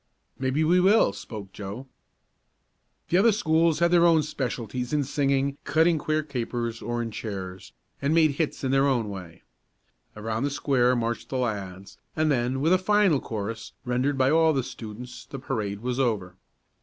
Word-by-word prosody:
"Maybe 130 +4 +1
we 175 +3 +4
will," 190 - +4
spoke 100 -1 -9
Joe. 105 +6 -7 1.2
The 175 - +3
other 225 +4 +5
schools 165 -5 +2
had 170 0 +2
their 175 -1 +6
own 160 -2 +4
specialties 125 -3 -4
in 150 -1 +2
singing, 140 0 0
cutting 160 +2 +3
queer 155 +1 0
capers, 120 -4 -3
or 120 0 -2
in 115 - -5
cheers, 95 -4 -6 0.3
and 140 +1 +1
made 160 -2 +5
hits 150 +1 -2
in 130 - 0
their 135 +1 +4
own 120 -6 +1
way. 90 -4 -9 0.7
Around 110 +3 -2
the - - 0
square 130 -3 +2
marched 120 -1 -2
the 130 - -2
lads, 100 -6 -4 0.2
and 155 -1 +2
then, 130 0 0
with 165 +5 +3
a 185 - +4
final 195 -5 +3
chorus, 110 0 -5
rendered 130 +3 0
by 130 +1 +3
all 160 0 +4
the 135 -3 0
students, 120 +1 -9
the 135 - -7
parade 105 -6 -3
was 125 +1 -2
over. 105 -8 0
130 Hz, 170 wpm, -26 LUFS, 115-155 Hz, 1.2 s, their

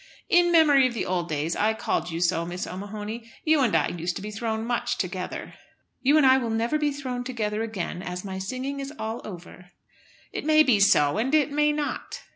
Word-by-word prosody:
"In 350 0 +4
memory 295 -6 +6
of 240 - -6
the - - -2
old 180 -1 -2
days 155 +2 -1
I 220 +1 +1
called 220 - -1
you 165 0 -4
so, 170 -1 +2
Miss 175 +2 -4
O'Mahony. 210 +5 -7
You 315 -2 +3
and 240 -5 +2
I - - +2
used 175 +1 -3
to - - -5
be 210 - -5
thrown 220 0 -3
much 240 0 -1
together." - - -4 0.5
"You 280 +3 +4
and 300 - +5
I 260 0 +6
will 235 -3 -3
never 230 +7 0
be 295 -1 +1
thrown 260 -3 -4
together 220 -4 -2
again, 200 -5 -4
as 180 +1 -6
my 190 -1 -5
singing 255 +8 -4
is 275 0 -5
all 220 +1 -4
over." 180 -1 -10 0.6
"It - - -4
may 310 +1 +5
be 250 -8 +3
so 170 -3 +4
and 265 +7 +1
it 300 -1 +2
may 300 +1 +3
not." 295 -1 -4
225 Hz, 215 wpm, -25 LUFS, 190-275 Hz, 0.6 s, memory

